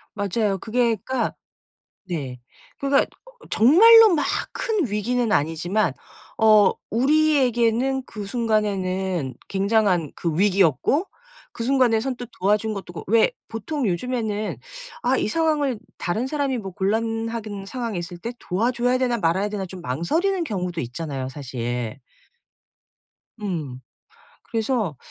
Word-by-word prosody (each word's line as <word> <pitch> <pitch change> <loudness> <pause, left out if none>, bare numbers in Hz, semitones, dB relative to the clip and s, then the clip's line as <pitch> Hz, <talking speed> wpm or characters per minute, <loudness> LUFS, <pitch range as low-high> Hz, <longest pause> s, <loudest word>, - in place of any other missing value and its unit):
맞아요. 205 0 0
그게 235 +3 +1
그러니까 260 0 -1 0.7
네 140 -8 -4 0.4
그러니까 275 0 +2 0.2
어 - - -17
정말로 430 - +8
막 300 - +1 0.3
큰 435 - 0
위기는 225 +3 0
아니지만 165 +4 +1 0.5
어 215 -2 +6 0.2
우리에게는 265 -2 +2
그 210 -2 -7
순간에는 190 - -1
굉장한 195 -5 +1
그 165 -3 -2
위기였고 200 - +3 0.5
그 230 - -6
순간에 250 -3 +3
선뜻 245 -1 -4
도와준 210 +3 +1
것도 190 -3 -7
그렇 - - -8
왜 225 +2 +4 0.2
보통 250 +4 -3
요즘에는 215 +2 -2 0.5
'아 255 +2 +2
이 - - 0
상황을 295 -4 +1 0.2
다른 215 +8 -1
사람이 275 -2 -1
뭐 195 -4 -6
곤란하든 225 +1 -2
상황에 235 -4 -4
있을 175 +1 -6
때 235 +6 -5
도와줘야 240 +6 0
되나 245 -2 +1
말아야 185 +3 +1
되나.' 205 -2 -4
좀 185 0 -9
망설이는 325 - 0
경우도 180 - -3
있잖아요 130 +1 -4
사실. 125 -3 -4 1.4
음. 160 -11 -4 0.7
그래서 225 - -1
215 Hz, 275 characters per minute, -23 LUFS, 180-250 Hz, 1.4 s, 정말로